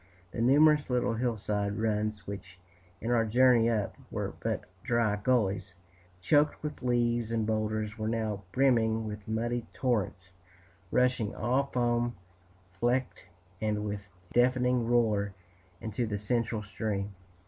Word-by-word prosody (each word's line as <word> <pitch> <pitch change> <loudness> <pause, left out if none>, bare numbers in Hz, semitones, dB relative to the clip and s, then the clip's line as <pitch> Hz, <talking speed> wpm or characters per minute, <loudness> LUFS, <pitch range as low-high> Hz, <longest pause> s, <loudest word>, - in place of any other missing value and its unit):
The 115 - -3
numerous 150 +4 +5
little 125 -2 +1
hillside 105 -3 -1
runs 105 -2 -1
which, 95 -2 -8 0.4
in 115 - -1
our 115 -2 +4
journey 120 +1 +4
up, 110 -4 -1
were - - -3
but - - -2 0.2
dry 115 -2 +1
gullies 100 -4 0 0.5
choked 145 +12 +3
with 150 -1 -5
leaves 120 -2 +1
and 115 -2 0
boulders, 110 0 -1
were 110 - -1
now 110 -3 -1
brimming 115 -2 +2
with 105 -1 -7
muddy 115 +1 -1
torrents, 100 -7 -1 0.6
rushing 125 -3 +1
all 130 +5 +1
foam 120 -1 0 0.6
flecked 120 -3 0 0.3
and 105 -1 0
with 100 -2 -5 0.2
deafening 125 -1 +3
roar 105 -5 +2 0.4
into 110 +1 -2
the 105 -1 -2
central 110 +1 -1
stream. 100 -1 -3
115 Hz, 125 wpm, -30 LUFS, 105-120 Hz, 0.6 s, numerous